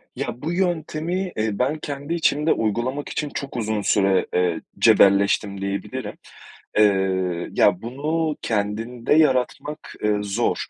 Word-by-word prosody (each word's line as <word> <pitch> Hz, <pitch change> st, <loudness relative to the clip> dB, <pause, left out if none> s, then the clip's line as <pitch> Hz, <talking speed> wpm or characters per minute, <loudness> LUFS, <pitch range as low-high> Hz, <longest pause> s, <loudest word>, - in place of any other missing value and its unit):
Ya 120 Hz, -, -4 dB
bu 160 Hz, +3 st, -2 dB
yöntemi, 175 Hz, 0 st, -1 dB
eee, 110 Hz, -1 st, -1 dB
ben 145 Hz, +5 st, 0 dB
kendi 145 Hz, +2 st, -5 dB
içimde 155 Hz, -2 st, +2 dB
uygulamak 120 Hz, +6 st, -2 dB
için 150 Hz, -, -3 dB
çok 140 Hz, -2 st, -6 dB
uzun 110 Hz, -2 st, -1 dB
süre, 95 Hz, -2 st, +2 dB
eee, 90 Hz, -2 st, +1 dB, 0.2 s
cebelleştim 100 Hz, 0 st, +4 dB
diyebilirim. 100 Hz, 0 st, -4 dB, 0.7 s
Eee, 95 Hz, -4 st, +2 dB
ya 95 Hz, -2 st, +3 dB
bunu 150 Hz, +6 st, -2 dB
kendinde 115 Hz, +4 st, -1 dB
yaratmak, 150 Hz, +1 st, +1 dB
ııı, 105 Hz, -1 st, +1 dB
zor. 105 Hz, +4 st, 0 dB
120 Hz, 125 wpm, -23 LUFS, 100-150 Hz, 0.7 s, cebelleştim